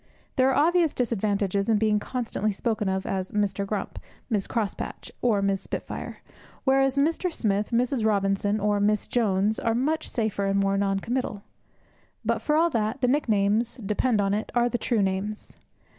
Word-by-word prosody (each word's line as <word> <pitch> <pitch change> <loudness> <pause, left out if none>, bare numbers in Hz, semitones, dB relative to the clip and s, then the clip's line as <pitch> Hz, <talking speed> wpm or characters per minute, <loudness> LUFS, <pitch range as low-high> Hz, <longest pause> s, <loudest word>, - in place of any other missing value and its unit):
There 260 0 +4
are 265 - +1
obvious 345 -3 +2
disadvantages 205 -4 0
in 220 - +4
being 210 0 +2
constantly 230 -2 -2
spoken 210 0 -1
of 190 0 -1
as 190 -1 -3
Mr. 200 -1 0
Grump, 205 -1 -4 0.3
Mrs. 205 -3 0
Crosspatch, 220 -4 -3
or 215 -5 +2
Miss 195 -1 +1
Spitfire; - - -6 0.4
whereas 270 0 +3
Mr. 330 +5 +1
Smith, 205 -7 0
Mrs. 245 0 +1
Robinson, 200 0 +1
or 205 0 +1
Miss 210 0 +2
Jones 210 -2 +1
are 225 -1 0
much 310 +6 0
safer 215 -4 -1
and 195 0 +2
more 195 0 +2
non 195 0 0
committal. 230 -4 -3 0.8
But, - - 0
for 300 - +1
all 335 +2 +3
that, 225 +1 -1
the 250 - +3
nicknames, 225 -3 +1
depend 215 +1 0
upon 200 0 +1
it, 210 +1 -2
are 240 0 +3
the 240 - -2
true 225 -5 +1
names. 195 +2 -3
215 Hz, 170 wpm, -26 LUFS, 200-245 Hz, 0.8 s, There